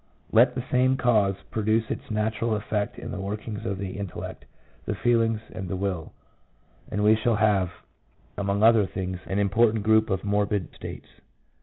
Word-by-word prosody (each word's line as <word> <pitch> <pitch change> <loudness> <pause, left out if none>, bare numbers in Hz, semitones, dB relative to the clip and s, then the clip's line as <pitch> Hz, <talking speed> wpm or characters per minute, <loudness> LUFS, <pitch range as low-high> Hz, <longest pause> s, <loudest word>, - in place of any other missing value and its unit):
Let 120 +2 +5
the 125 - -2
same 130 +1 +3
cause 110 -7 +3 0.2
produce 110 +1 +1
its - - -5
natural 110 +1 0
effects 105 0 -2
in - - -7
the 100 - -5
workings 105 +1 -5
of 95 0 -2
the 95 0 -5
intellect, 100 -4 -6 0.4
the - - -2
feelings, 115 -2 +2
and 95 - -6
the 95 - -2
will, 90 -4 -3 0.8
and 105 +2 -1
we 105 +1 +6
shall 110 +1 +1
have, 105 -4 +2 0.7
among 100 +1 0
other 110 -3 +6
things, 95 0 -4
an 95 - -2
important 105 +2 +3
group 110 0 +4
of 95 -1 -1
morbid... 100 -2 0
states. - - -9
105 Hz, 165 wpm, -26 LUFS, 100-110 Hz, 0.8 s, we